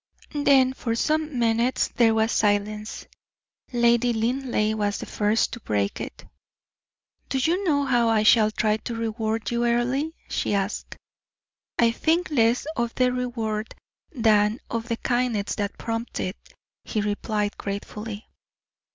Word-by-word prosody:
Then 265 -2 +5
for 230 -3 -2
some 310 +2 0
minutes 235 +2 +2
there 225 -2 +3
was 220 +1 +2
silence. 210 +1 0 0.7
Lady 240 0 +3
Linleigh 230 -1 0
was 205 -1 0
the - - -6
first 210 +2 +1
to 235 - -6
break 100 - -1
it. - - -8 1.0
"Do 270 - 0
you 335 +9 +1
know 285 -4 +2
how 240 -3 +3
I 220 -1 +3
shall 215 0 +6
try 215 0 +1
to 230 +2 -6
reward 225 -1 -2
you, 235 0 0
Earle?" 240 +5 +1 0.2
she - - -1
asked. 200 +1 -3 0.8
"I 235 -1 +4
think 330 +8 0
less 235 -2 +3
of 235 -1 -2
the 250 -1 +2
reward 230 -4 -3 0.4
than 220 - +3
of 230 0 -2
the 230 -2 -1
kindness 240 -5 0
that 205 -2 -3
prompts 230 +1 -4
it," 185 +3 -2 0.5
he 215 - -2
replied, 210 0 -1
gratefully. 210 +2 -6
230 Hz, 140 wpm, -25 LUFS, 215-245 Hz, 1.0 s, shall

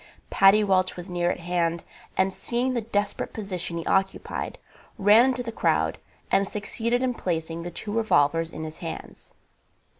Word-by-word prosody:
Paddy 195 +2 +6
Welch 185 -2 +2
was 180 +1 -8
near 175 0 +1
at - - -2
hand, 170 -1 0 0.3
and 190 0 +2
seeing 245 +5 -1
the 240 - 0
desperate 205 -2 -2
position 185 -5 -4
he 165 - -4
occupied, 195 0 -1 0.4
ran 210 +5 +6
into 255 -1 0
the 230 - -4
crowd - - +1 0.3
and 195 0 +3
succeeded 230 +4 -1
in 255 -1 +1
placing 165 -5 -3
the 175 - -5
two 205 +4 -6
revolvers 165 -7 +2
in 160 -1 -7
his 155 0 -7
hands. 165 -2 -8
195 Hz, 160 wpm, -26 LUFS, 170-220 Hz, 0.4 s, Paddy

